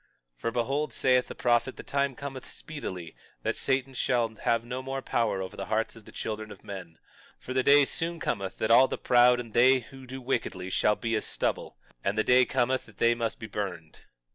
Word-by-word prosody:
22:15 - - -30
For - - 0
behold, 135 +6 -1
saith 125 -1 +3
the - - -8
prophet, 120 +2 +1
the - - -9
time 140 -1 0
cometh 135 -1 -7
speedily 95 - -7 0.3
that - - 0
Satan 135 0 0
shall 120 -2 +1
have 115 0 0
no 125 +2 -4
more 135 0 -4
power 110 -5 0
over 95 +2 -8
the - - -5
hearts 110 +1 -1
of 115 -2 -14
the - - -13
children 110 0 -5
of 100 - -12
men; 90 -5 -8 0.4
for 130 - -7
the 130 - +3
day 145 +2 +6
soon 165 +4 -3
cometh 95 -8 -3
that 110 - 0
all 130 +3 +8
the - - -3
proud 125 0 +5
and 115 -3 -7
they 130 +2 +5
who 130 +2 -13
do 130 +1 -6
wickedly 95 -8 -2
shall 105 +2 +3
be 115 +1 -3
as 110 - -1
stubble; - - -2 0.3
and 100 +2 0
the 110 - +3
day 125 +2 +5
cometh 130 +2 0
that 110 -3 -18
they 115 0 +4
must 115 -1 -2
be 115 - -7
burned. 95 -7 -5
120 Hz, 220 wpm, -28 LUFS, 110-130 Hz, 0.4 s, all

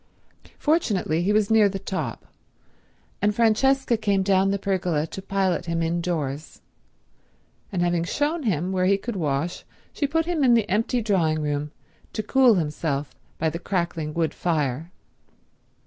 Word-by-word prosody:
Fortunately 210 - +1
he 190 +4 +1
was 210 0 +2
near 215 -2 +5
the 195 - -4
top, 190 0 -4 1.0
and 205 0 +2
Francesca 240 +3 +3
came 200 -3 +1
down 190 0 +3
the 200 - +1
pergola 180 -6 0
to 190 - -8
pilot 190 -3 -1
him 165 0 0
indoors, 165 -4 -3 1.1
and 180 -3 0
having 175 -1 +1
shown 295 - -1
him 185 - -1
where 185 -1 +1
he 200 +1 +4
could 235 +3 -5
wash 155 -1 -2 0.3
she 285 - -1
put 325 +3 0
him 335 -4 0
in 245 -2 +6
the 225 -3 +2
empty 225 +4 0
drawing 165 -7 +1
room 145 0 -2 0.4
to 215 - -2
cool 255 0 +5
himself 150 -3 -2 0.2
by 160 - 0
the 165 +1 -2
crackling 170 -4 -2
wood 165 -2 0
fire. 155 -2 -1
190 Hz, 150 wpm, -24 LUFS, 165-215 Hz, 1.1 s, in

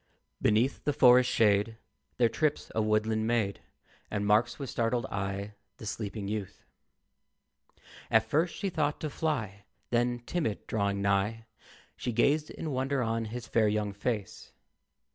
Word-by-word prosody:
Beneath 115 +6 +2
the 145 - +1
forest 125 -2 +6
shade 105 +1 +3 0.4
There 120 - +5
trips 150 +5 -1
a 110 - +1
woodland 110 +1 +1
maid, 110 -4 0 0.5
And 105 -1 -2
marks 105 +3 +3
with 140 -4 -5
startled 120 0 0
eye 100 +1 -3 0.2
the - - -9
sleeping 105 -1 -4
youth. 105 -2 -5 1.4
At 110 0 +4
first 160 +7 +1
she 195 -2 -2
thought 150 -3 0
to 155 - -3
fly, 115 - -2 0.3
Then, 120 0 +2
timid, 155 -12 -2
drawing 100 -2 -1
nigh, 100 +3 +1 0.5
She 125 - -3
gazed 145 +6 +2
in 155 - -5
wonder 135 0 0
on 115 0 -1
his 115 +1 -6
fair 115 -2 +2
young 105 -1 0
face. 105 0 -4
115 Hz, 145 wpm, -30 LUFS, 105-125 Hz, 1.4 s, forest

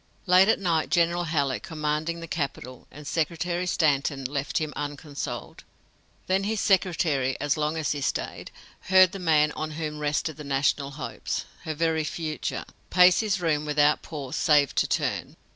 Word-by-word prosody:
Late 185 +1 +6
at 225 - +4
night 170 -5 0
General 175 0 +2
Halleck, 140 -5 0
commanding 160 -1 -2
the 165 - -7
capital, 135 -5 -5
and 150 +1 -12
Secretary 170 +4 -1
Stanton 140 -4 +1
left 140 +2 -2
him 155 -2 -2
unconsoled. 145 -1 -6 0.6
Then 190 +1 +1
his 215 0 -1
secretary, 170 - +1
as 145 -1 +1
long 155 +1 -1
as 155 -2 -1
he 145 - -2
stayed, - - -3 0.4
heard 185 -1 +7
the 195 - -7
man 155 -4 +3
on 155 +1 -4
whom 150 -2 -4
rested 150 +1 -1
the 150 - -8
national 140 0 0
hopes 140 -1 -5 0.2
her 155 - -3
very 160 0 +1
future 155 0 -4 0.2
pace 180 0 +6
his 210 -3 0
room 155 -4 0
without 150 0 +2
pause 140 -5 -6
save 145 -4 +3
to - - +1
turn. - - -2
155 Hz, 160 wpm, -26 LUFS, 145-175 Hz, 0.6 s, heard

